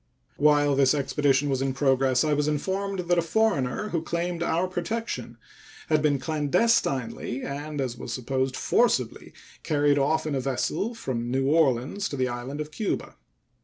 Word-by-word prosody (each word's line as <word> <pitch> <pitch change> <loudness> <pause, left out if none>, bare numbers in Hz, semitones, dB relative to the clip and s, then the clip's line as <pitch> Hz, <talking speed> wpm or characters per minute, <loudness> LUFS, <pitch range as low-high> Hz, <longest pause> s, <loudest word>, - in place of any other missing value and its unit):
While 145 -1 +4
this 135 +1 +4
expedition 140 0 +1
was 135 -2 0
in 135 -1 -1
progress 135 -2 +2
I 155 -1 +1
was 145 0 +1
informed 190 +5 -1
that 175 0 +2
a - - +3
foreigner 180 - 0
who 170 -4 -1
claimed 170 +1 -3
our 170 +2 +1
protection 185 +6 -4 0.5
had 155 -1 +3
been 145 -2 +2
clandestinely 140 - 0
and, 145 +2 -5
as 125 -3 -3
was - - -6
supposed, 130 +2 -2
forcibly 130 - +1 0.3
carried 145 -1 +2
off 155 +4 +1
in 155 - -2
a 135 - 0
vessel 135 - -2
from 120 - -3
New 135 +1 0
Orleans 150 +4 +1
to 140 - -5
the 130 -1 0
island 120 +4 -5
of 150 0 -5
Cuba. 210 +5 -3
145 Hz, 165 wpm, -26 LUFS, 135-170 Hz, 0.5 s, While